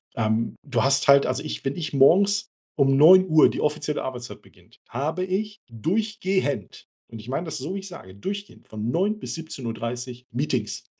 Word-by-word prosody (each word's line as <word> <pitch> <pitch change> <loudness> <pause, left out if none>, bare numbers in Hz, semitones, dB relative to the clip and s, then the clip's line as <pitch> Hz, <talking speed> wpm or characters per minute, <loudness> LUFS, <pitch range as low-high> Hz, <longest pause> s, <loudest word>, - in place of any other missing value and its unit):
Ähm, 110 0 0
du 120 -5 0
hast 135 +1 +2
halt 140 0 +7
also 130 +3 -2
ich 155 - -6
wenn 135 - -1
ich 155 -4 -5
morgens 195 +9 +4 0.3
um 135 -2 +3
9:00 165 +1 +7
die - - -4
offizielle 150 0 -1
Arbeitszeit 125 -1 -7
beginnt, - - -23
habe 155 +9 -2
ich 205 +3 -3
durchgehend 185 - -2 0.2
und 115 - -8
ich 110 +3 -11
meine 160 +6 -2
das 155 -3 -5
so, 155 +9 -4
wie 200 - -3
ich 195 - -9
sage, 95 - -11
durchgehend 200 - -7
von 110 +1 -4
9:00 200 - 0
bis - - -5
17:30 125 -4 -6
Meetings. 125 -4 -2
145 Hz, 175 wpm, -24 LUFS, 125-185 Hz, 0.3 s, halt